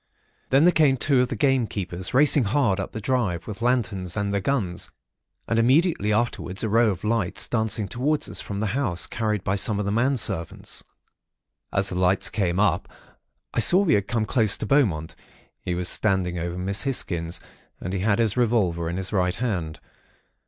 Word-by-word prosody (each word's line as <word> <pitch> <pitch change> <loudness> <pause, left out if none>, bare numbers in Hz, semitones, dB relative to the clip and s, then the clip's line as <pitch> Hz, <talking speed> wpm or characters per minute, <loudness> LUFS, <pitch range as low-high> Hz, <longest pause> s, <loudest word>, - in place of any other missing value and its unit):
Then 135 +3 +4
there 175 - +6
came 145 -6 +3
two 135 0 +2
of 125 - +1
the 120 - -4
gamekeepers, 105 -8 -1
racing 140 -1 +4
hard 105 -3 +1
up 95 - -4
the 110 - -6
drive, 105 -8 -1
with 105 +1 -8
lanterns 110 -7 -1
and 100 0 -1
their 100 - 0
guns; 100 -7 -2 0.6
and 115 - +1
immediately 130 - +2
afterwards 105 -3 -2
a 110 - -1
row 115 +1 +3
of 95 -3 -4
lights 110 -4 0
dancing 110 -3 0
towards 140 +8 -1
us - - -3
from 100 - -6
the 105 - -1
house, 120 -11 +2
carried 105 -4 -2
by 95 - 0
some 100 +1 +2
of 105 - -2
the 100 - -1
men 130 +5 +1
servants. 95 -8 -2 0.9
"As 95 0 0
the 90 - -3
lights 95 +1 +2
came 95 -4 -1
up, 95 -1 +1 0.6
I - - 0
saw 180 - +6
we 165 -6 +2
had 100 -4 +1
come 115 -2 -1
close 110 -3 +2
to - - -4
Beaumont. 100 - +1 0.5
He 90 - -3
was 90 0 -1
standing 90 -4 +1
over 85 +1 -4
Miss 100 +3 -1
Hisgins, 85 -10 -2 0.4
and 90 - -5
he 95 - -1
had 105 +2 +1
his 115 -4 +1
revolver 100 -9 +1
in 85 - -4
his 95 +2 -3
right 90 -1 +1
hand. 95 -10 -3
105 Hz, 190 wpm, -24 LUFS, 95-120 Hz, 0.9 s, there